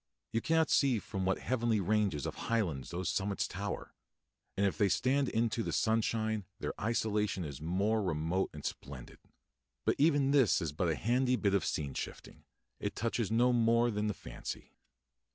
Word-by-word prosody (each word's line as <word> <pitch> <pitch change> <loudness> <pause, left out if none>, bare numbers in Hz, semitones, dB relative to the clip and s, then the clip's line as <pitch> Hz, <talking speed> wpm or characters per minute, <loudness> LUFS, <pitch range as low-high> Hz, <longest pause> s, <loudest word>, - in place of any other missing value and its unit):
You 115 - 0
cannot 160 -1 +2
see 135 -4 +4
from 95 -2 -4
what 95 0 +2
heavenly 120 -3 0
ranges 100 -6 +1
of - - -3 0.2
highlands 90 - 0
those 90 +2 -3
summits 100 0 0
tower, - - -5 0.6
and 100 - +3
if 100 - +1
they 100 -3 +2
stand 135 +5 +2
into 115 0 0
the - - -2
sunshine 110 -2 +1
their - - -3
isolation 105 -4 0
is 70 -4 -6
the 75 - -8
more 100 +6 +1
remote 85 +1 0
and - - -9
splendid. 65 -3 -7 0.7
But - - +4
even 145 -2 +4
this 135 -7 +4
is 85 -5 -2
but 85 +4 0
a 80 - +1
handy 125 - +2
bit 100 -5 +1
of 100 - +2
scene 70 -3 -2
shifting; - - -7 0.3
it - - -3
touches 115 -1 -1
no 120 +3 +3
more 115 0 +3
than 105 0 -1
the 105 - -1
fancy. - - -8
105 Hz, 175 wpm, -33 LUFS, 95-120 Hz, 0.7 s, see